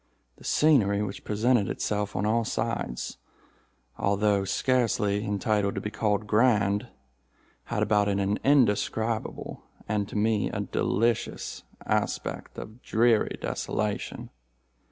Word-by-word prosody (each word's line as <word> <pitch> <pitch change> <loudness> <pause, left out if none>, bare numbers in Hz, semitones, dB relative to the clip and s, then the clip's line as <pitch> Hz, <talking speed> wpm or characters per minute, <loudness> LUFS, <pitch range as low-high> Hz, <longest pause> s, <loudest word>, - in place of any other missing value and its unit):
The - - -17
scenery 105 -10 +3
which 100 -1 -6
presented 110 0 +2
itself 105 -1 -2
on 105 - 0
all 115 +2 +2
sides, 60 - -3 0.8
although 100 0 +2
scarcely 105 -2 +1
entitled 105 0 0
to - - -2
be 105 - -4
called 105 -1 0
grand, 105 -2 +2 0.8
had - - -1
about 105 -1 +2
it 100 -1 +1
an 100 +1 0
indescribable 115 -4 +1 0.3
and 100 -1 -1
to - - -9
me 105 0 +1
a - - -3
delicious 115 +3 -1 0.2
aspect - - -2
of 110 +4 -9
dreary 115 -1 +2
desolation. 105 -1 -3
105 Hz, 115 wpm, -27 LUFS, 100-115 Hz, 0.8 s, scenery